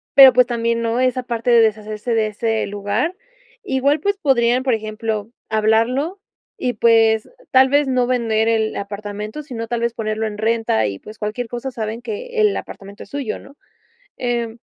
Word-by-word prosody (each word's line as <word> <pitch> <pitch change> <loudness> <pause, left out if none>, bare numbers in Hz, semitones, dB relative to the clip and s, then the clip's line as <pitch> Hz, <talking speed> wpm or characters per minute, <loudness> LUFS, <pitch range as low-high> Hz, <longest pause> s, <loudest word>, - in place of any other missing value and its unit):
pero 270 -2 +10
pues 250 0 +5
también, 230 -1 0
¿no?, 230 +1 0
esa 255 0 +1
parte 235 0 -2
de 235 -1 +7
deshacerse 215 +1 -1
de 220 -1 +2
ese 220 +1 -1
lugar, 205 - -2 0.5
igual 275 +3 +1
pues 405 +3 0
podrían, 250 -5 +2
por 260 -2 +2
ejemplo, 215 0 -3 0.2
hablarlo 230 - +1 0.4
y 250 -1 -1
pues 225 -1 +3 0.2
tal 260 0 +6
vez 285 +1 +3
no 255 -1 +2
vender 225 -3 +1
el 220 -1 +1
apartamento, 205 +5 -6
sino 235 -5 -6
tal 240 0 -2
vez 235 0 0
ponerlo 220 -1 -2
en 210 -1 -6
renta 220 - +1
y 100 -1 -5
pues 215 +1 -12
cualquier 215 +3 -3
cosa 240 +3 -5
saben 225 -1 -4
que 460 - -4
el 420 -1 +3
apartamento 200 +1 -9
es - - -17
suyo, 275 -6 -4
¿no?, 280 - -15 0.6
em, 235 -2 -2
230 Hz, 175 wpm, -20 LUFS, 215-255 Hz, 0.6 s, pero